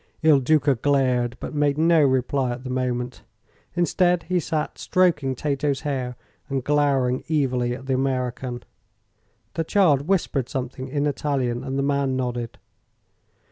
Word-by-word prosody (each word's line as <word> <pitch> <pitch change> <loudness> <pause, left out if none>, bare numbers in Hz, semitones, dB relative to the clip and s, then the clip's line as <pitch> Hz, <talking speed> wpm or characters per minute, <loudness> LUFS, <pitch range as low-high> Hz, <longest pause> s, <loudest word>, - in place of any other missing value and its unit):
Il 155 -3 +6
Duca 145 +1 +3
glared, 125 -2 +1
but - - -6
made 145 -1 +1
no 165 0 +4
reply 130 -1 +1
at 125 +1 -8
the 130 - -5
moment. 125 -1 -2 0.5
Instead, 175 0 +2
he 185 -1 0
sat 155 -2 -3
stroking 155 -8 +2
Tato's 140 0 -1
hair 130 -4 -3 0.3
and 135 -2 -1
glowering 140 -3 +1
evilly 125 -5 +1
at 130 - -10
the 135 - 0
American. 130 -2 -2 0.9
The 165 - -1
child 160 -6 +3
whispered 155 -9 0
something 130 -1 -4
in 145 +2 -1
Italian, 135 -4 -1
and 135 0 -3
the 140 - +1
man 140 -1 +1
nodded. 120 -2 -3
135 Hz, 140 wpm, -24 LUFS, 125-150 Hz, 0.9 s, Il